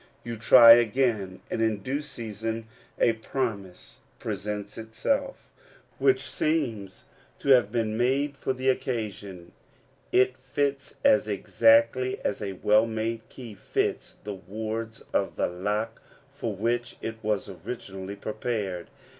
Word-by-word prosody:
You 120 0 -5
try 115 +1 +9
again, 115 -5 +3
and - - -1
in 110 -3 0
due 140 +5 -2
season 115 -5 -5 0.3
a 115 - +4
promise 110 -5 -5 0.2
presents 105 0 -4
itself, 270 - -2 0.5
which 395 - +3
seems 120 - -2 0.3
to - - -4
have 120 -6 +6
been 110 -2 -1
made 135 +4 +1
for 135 - -2
the 130 0 -3
occasion; 105 -8 -3 0.6
it 130 0 +3
fits 140 +1 -2
as 105 0 +5
exactly 115 +4 +3
as 105 - -1
a 100 -2 -3
well 105 +4 +3
made 115 0 -3
key 120 -4 -10
fits 100 - -2
the 105 - -4
wards 110 +3 -5
of - - 0
the - - +1
lock 105 +5 -3 0.3
for 115 -6 -4
which 120 +4 -1
it 110 0 -4
was 105 -1 -1
originally 95 -1 -7
prepared. 100 -3 -3
115 Hz, 130 wpm, -27 LUFS, 105-125 Hz, 0.6 s, try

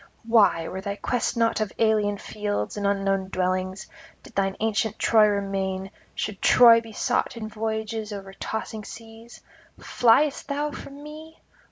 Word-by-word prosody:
Why, 200 -8 +4
were 190 - -5
thy 200 0 -4
quest 245 +3 -2
not 230 -1 +1
of 215 - -1
alien 215 -2 +2
fields 205 - -3
and 205 -1 -1
unknown 195 -1 0
dwellings, 185 +1 -2 0.4
did - - -15
thine 195 -1 0
ancient 220 0 0
Troy 220 -2 +5
remain, 195 -1 -2 0.2
should 210 -2 -4
Troy 230 -2 +7
be 225 -1 -12
sought 220 - -1
in 220 -2 -5
voyages 220 0 -4
over 195 -1 -7
tossing 220 +1 -5
seas? 225 +2 -12 0.4
Fliest 270 +5 +2
thou 295 +1 -2
from 280 0 -10
me? 310 +2 -11
215 Hz, 150 wpm, -25 LUFS, 195-230 Hz, 0.4 s, Troy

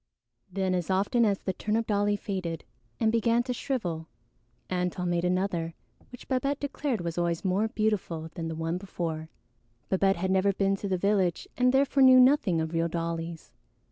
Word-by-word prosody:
Then 190 0 0
as 180 -1 -2
often 200 +5 +2
as 200 -2 +2
this 190 - -3
turnip 220 +2 0
dolly 205 -1 +1
faded 185 -5 -4 0.4
and 220 - +3
began 230 +1 +2
to 250 0 -2
shrivel, 180 - -3 0.6
Antone 180 0 -1
made 170 0 0
another, 180 -2 -1 0.4
which 250 - -12
Babette 275 +2 0
declared 280 -5 -2
was 170 0 -3
always 170 +1 -1
more 195 +4 +2
beautiful 195 -8 -2
than 165 -1 -4
the 160 - -4
one 165 +2 -2
before. 165 -4 -4 0.6
Babette 195 0 +3
had 185 +2 -1
never 190 +1 +3
been 195 0 +1
to 200 - -4
the 190 -1 0
village 190 -2 +1
and 250 0 +3
therefore 275 +1 +3
knew 260 -1 +8
nothing 250 - +4
of 160 +1 -3
real 165 0 +1
dollies. 165 0 -4
190 Hz, 170 wpm, -28 LUFS, 170-220 Hz, 0.6 s, knew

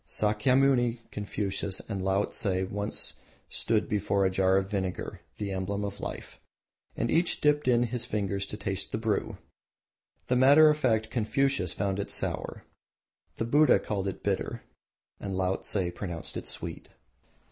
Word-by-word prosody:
Sakyamuni, 120 +3 +2
Confucius, 100 -2 -3
and 100 -4 -5
Laotse 95 0 +2
once 100 +1 -1 0.4
stood 110 -2 0
before 100 -1 +1
a 95 - +2
jar 95 0 +3
of 95 0 0
vinegar 95 -3 -3 0.2
the 100 -2 -3
emblem 100 +2 -2
of 100 0 -6
life - - -7 0.6
and 115 - 0
each 170 +2 +2
dipped 150 -1 +2
in 120 -1 +4
his 120 0 -2
finger 100 -2 -1
to 100 +2 -4
taste 95 -2 -3
the - - -1
brew. 110 -2 -1 0.9
The 125 - +1
matter 140 +5 +7
of 150 - +2
fact 110 -5 +1
Confucius 120 -4 +1
found 100 0 -1
it 100 - -3
sour, - - -2 0.7
the 115 - -2
Buddha 150 +6 +5
called 100 -2 -3
it 95 - -5
bitter, - - -2 0.6
and 95 -2 -4
Laotse 95 +2 0 0.2
pronounced 85 -3 -5
it - - -4
sweet. - - -5
105 Hz, 145 wpm, -29 LUFS, 95-120 Hz, 0.9 s, matter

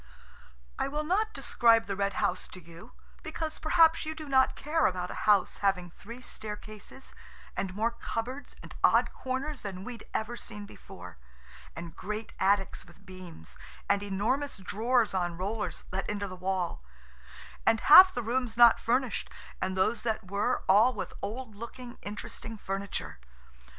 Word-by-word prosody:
I - - +1
will 300 +2 -2
not 410 +7 +1
describe 230 - +3
the 195 - -3
Red 200 0 0
House 185 - -1
to 185 - -11
you–because 200 - -8
perhaps 325 +1 +4
you 315 0 -4
do 310 -1 -8
not 265 -1 +4
care 310 +3 +1
about 180 -1 -3
a - - -3
house 200 -3 +4
having 185 -3 0
three 235 +8 -11
staircases 215 +2 -9 0.4
and 190 -1 -3
more 225 +3 +1
cupboards 235 +3 -5
and - - -10
odd - - +4
corners 265 +3 -3
than 190 -2 -6
we'd 235 0 -8
ever 220 +2 -2
seen 210 -3 -8
before, 90 - -12 0.6
and 170 0 -8
great 210 +3 -5
attics 195 0 +1
with 180 +2 -19
beams, 185 - -11 0.3
and 200 0 +2
enormous 215 +9 -1
drawers 225 +4 +1
on 175 -2 -1
rollers, 205 +4 -3
let 190 +1 -3
into 205 -1 -2
the 185 - -8
wall–and 175 - -3
half 370 +5 +10
the 245 - -3
rooms 235 0 -1
not 240 -1 +8
furnished, 245 0 0 0.3
and 190 0 -1
those 190 +5 +2
that 220 -5 -3
were 200 +1 0
all 220 +6 +5
with - - -5
old 225 +1 -5
looking, 240 +3 -9
interesting 215 +2 -7
furniture. 195 - -4
210 Hz, 150 wpm, -30 LUFS, 190-250 Hz, 0.6 s, half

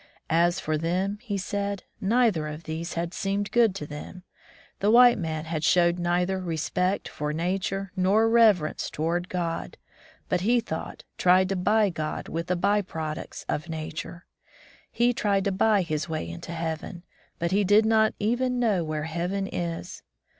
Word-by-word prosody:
As 175 +3 +3
for 155 -4 -1
them, 185 +5 -1
he 215 -5 -3
said, 200 0 -3 0.2
neither 210 -7 +2
of 150 +2 -7
these 160 +2 -5
had 170 +1 -2
seemed 200 +1 -2
good 230 -5 +4
to 150 - -5
them. 150 +5 -9 0.6
The 205 - +2
white 240 0 +7
man 160 -2 -3
had 160 -1 -3
showed 175 +1 +3
neither 180 +2 0
respect 180 +3 -1
for 150 0 -4
nature 190 +4 -2
nor 200 +4 +3
reverence 220 -9 +3
toward 170 +3 -2
God, 170 -2 -3 0.5
but, 180 - 0
he 240 +5 +3
thought, 160 -8 -6 0.2
tried 185 +1 +4
to 195 - 0
buy 210 +2 +2
God 155 -2 -4
with 165 +1 -3
the 180 - +1
by 200 +4 +2
products 160 -5 -6
of 155 +3 -3
nature. 160 +2 -6 0.7
He 240 +1 +2
tried 200 -4 +1
to 200 - 0
buy 205 +1 +3
his 155 -1 -3
way 155 - -3
into 85 - -7
heaven, 165 +1 -4 0.3
but 170 +1 -1
he 205 +2 +3
did 205 +3 +5
not 220 -1 +3
even 245 +4 0
know 210 -8 +2
where 155 -1 -3
heaven 175 +5 -2
is. 175 -2 -5
180 Hz, 165 wpm, -26 LUFS, 165-205 Hz, 0.7 s, white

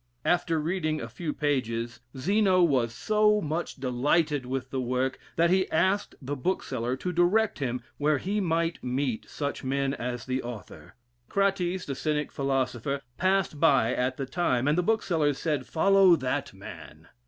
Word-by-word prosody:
Alter 165 -2 +2
reading 155 -1 -1
a 115 - -5
few 150 +7 -4
pages, 120 -6 -1 0.2
Zeno 190 +4 +3
was 130 -8 +2
so 210 - +2
much 165 -1 -3
delighted 135 +2 +1
with 130 0 -4
the 130 - -1
work, 130 +1 -1 0.2
that 170 +1 +3
he 190 0 +2
asked 190 +5 +1
the 145 +1 -4
bookseller 130 -5 -2
to 180 - -3
direct 180 +5 +2
him 125 -3 -2 0.2
where 150 0 +2
he 205 +7 -1
might 165 -1 0
meet 125 -2 -2
such 145 -1 -4
men 135 +1 0
as 125 -2 -4
the 130 0 -1
author? 120 -7 -9 0.3
Crates, 190 -2 0
the 140 - -3
Cynic 150 +1 -1
philosopher, 135 -1 -1 0.2
passed 185 -5 +1
by 135 -6 +4
at 130 +1 -1
the 135 - -2
time, 130 -3 0
and 150 - +3
the 180 - +2
bookseller 170 -8 +1
said, 150 -3 -2
"Follow 195 +1 +5
that 130 -5 -2
man!" 80 +2 -11
145 Hz, 160 wpm, -27 LUFS, 130-175 Hz, 0.3 s, Follow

